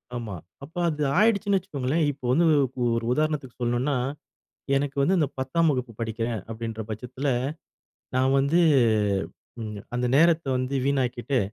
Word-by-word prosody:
ஆமா. 110 -5 -4 0.3
அப்ப, 155 +4 -12
அது 150 -1 -2 0.2
ஆயிடுச்சுனு 205 -2 +3
வச்சுக்கோங்களேன், 155 -3 -1
இப்ப 140 -2 -15
வந்து 170 +6 +4 0.2
ஒ - - +3 0.3
ஒரு 115 - -3
உதாரணத்துக்கு 150 -4 -1
சொல்லணும்னா, 120 +4 0 0.8
எனக்கு 140 0 -1
வந்து 185 +7 +3
இந்த 150 - +2
10தாம் 160 +5 +2
வகுப்பு 125 -3 -3
படிக்கிறேன், 115 0 -2
அப்படின்ற, 115 0 -5
பட்சத்துல 125 +6 -4 0.9
நான் 130 +1 +3
வந்து, 145 +6 +3 1.0
ம், 105 -2 -5
அந்த 125 0 0
நேரத்த 165 -1 +4
வந்து 130 +2 -2
வீணாக்கீட்டு, 130 -1 0
135 Hz, 135 wpm, -25 LUFS, 120-155 Hz, 1.0 s, வந்து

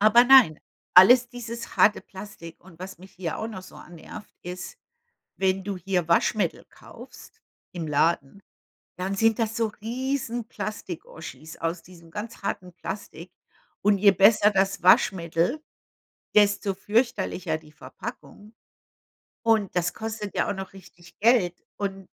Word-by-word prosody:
Aber 215 +4 +6
nein, 250 - +7 0.4
alles 245 +7 +8
dieses 235 -1 -8
harte 210 - +5
Plastik 190 -4 -11
und 180 -4 -16
was 185 0 -8
mich 190 +1 -15
hier 175 -3 -5
auch 220 - -3
noch 190 -4 -8
so 185 - -14
annervt, 175 +5 -12
ist, 180 - -8 0.6
wenn 190 0 +1
du 200 0 -4
hier 180 -2 -1
Waschmittel 205 +4 +1
kaufst 450 - -15 0.3
im 165 -3 -5
Laden, 150 +3 0 0.6
dann 185 +2 -3
sind 225 +1 +3
das 225 -1 -1
so 230 -1 +1
riesen 240 -1 -3
Plastik-Oschis 160 -7 -8
aus 165 +1 -3
diesem 170 -2 -16
ganz 210 +5 -7
harten 180 -2 -4
Plastik 185 -3 -8 0.5
und 205 0 +4
je 200 0 +6
besser 205 +2 +5
das 195 -2 0
Waschmittel, 180 - +3 0.7
desto 205 -1 +3
fürchterlicher 195 -5 -1
die 155 -1 -19
Verpackung, 210 +4 -10 0.9
und 220 -5 +2
das 175 -1 0
kostet 220 -2 -6
ja - - 0
auch - - 0
noch 190 0 -7
richtig 175 -2 -17
Geld 210 -6 +3 0.2
und 195 -2 -4
195 Hz, 140 wpm, -25 LUFS, 175-220 Hz, 0.9 s, alles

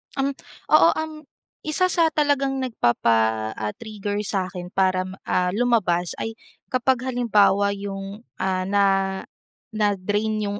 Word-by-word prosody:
Um, 275 0 0 0.4
oo - - +7
um, 315 0 -3 0.5
1 365 +4 +1
sa 335 -2 +4
talagang 275 -3 +1
nagpapa, 110 - +1
ah, 105 0 -3
trigger 210 -2 -5
sa 195 -3 -1
akin 180 0 -8
para, 185 -1 +2 0.2
ah, 180 0 +1
lumabas 200 -7 +1
ay 225 - -4 0.4
kapag 255 0 +1
halimbawa 205 -5 +2
'yong, 195 +2 -7 0.2
ah, 185 -1 0
na, 200 +2 +2 0.9
na-drain 210 +1 0
'yong 205 0 -3
205 Hz, 125 wpm, -23 LUFS, 185-245 Hz, 0.9 s, oo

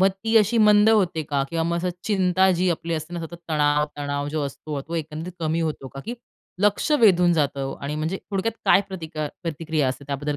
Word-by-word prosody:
मग 190 - +6 0.2
ती 225 0 +2
अशी 220 +2 +4
मंद 210 0 +6
होते 185 -7 +2
का? 140 -2 -1
किंवा 165 -1 0
मग 170 +1 0
असं, 180 +1 -1
चिंता 190 -2 +3
जी 180 0 +1
आपली 170 0 -2
असते 155 +2 -5
ना, 170 - -3
सतत 170 - -11 0.2
तणाव, 150 -1 +2
तणाव 145 0 -2
जो 150 0 -2
असतो, 145 +1 -6
तो 160 +4 -7
एकंदरीत 160 +2 -4
कमी 160 +1 0
होतो 155 -4 -3
का? 135 - -9
की 235 - -4 0.5
लक्ष 210 +8 +2
वेधून 180 -5 +5
जातं? 140 -4 -1
आणि 140 +1 -4
म्हणजे 160 +5 -2
थोडक्यात 200 +3 -1
काय 195 - +6
प्रतिका 160 -5 -5
प्रतिक्रिया 160 -3 -1
असते, 130 +2 -5
त्याबद्दल 145 +1 -2
165 Hz, 210 wpm, -24 LUFS, 150-185 Hz, 0.5 s, मग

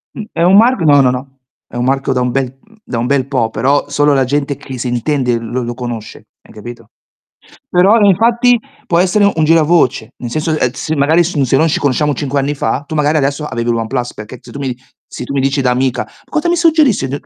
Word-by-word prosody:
Mh, 220 - -5
è - - -3
un 185 +2 +5
marc 230 -2 +4
no, 145 -3 +5
no, 125 -1 +3
no. 130 +1 -6 0.3
È - - -14
un 120 - -1
marchio 135 +1 0
da 125 - 0
un 125 0 0
bel 130 -1 -1
mhmm, 220 +8 -25
da 120 - -5
un 115 - -1
bel 135 0 0
po', 125 -5 0
però 140 +6 0
solo 145 +1 +2
la 135 -1 +2
gente 140 +2 -1
che 135 -3 -9
si 125 - -3
intende 125 0 0
lo 120 +2 -4
lo 120 0 -5
conosce, 120 -3 -7 0.2
hai - - -19
capito? 115 0 -11 0.8
Però 195 +6 +4
e 205 - +4
infatti 235 +5 +3 0.3
può 170 - +1
essere 200 +2 +3
un 160 - +1
gira 165 +1 +4
voce, 155 -5 +1
nel 120 -2 -7
senso, 155 +2 -1
ehm, 125 -4 0
se 155 +3 -4
magari 155 +5 +3
s 165 -3 -3
se 135 0 +2
noi 160 +3 +2
ci - - 0
conosciamo 145 +1 +1
5 140 -1 -2
anni 145 +2 -2
fa, 130 +2 -1
tu 155 - -5
magari 150 +1 +1
adesso 140 +1 -1
aveviil 115 -2 -2
OnePlus 120 +2 -3
perché 110 +4 -10
se - - -14
tu - - -9
mi 130 -3 -3 0.3
se - - -8
tu 140 - -6
mi 135 - 0
dici 135 +1 0
da 125 - +1
amica: 130 0 -1 0.2
"Cosa 310 +2 -1
mi 345 - +2
suggerisci 315 - +2
d" 140 +2 -4
140 Hz, 245 wpm, -14 LUFS, 125-160 Hz, 0.8 s, un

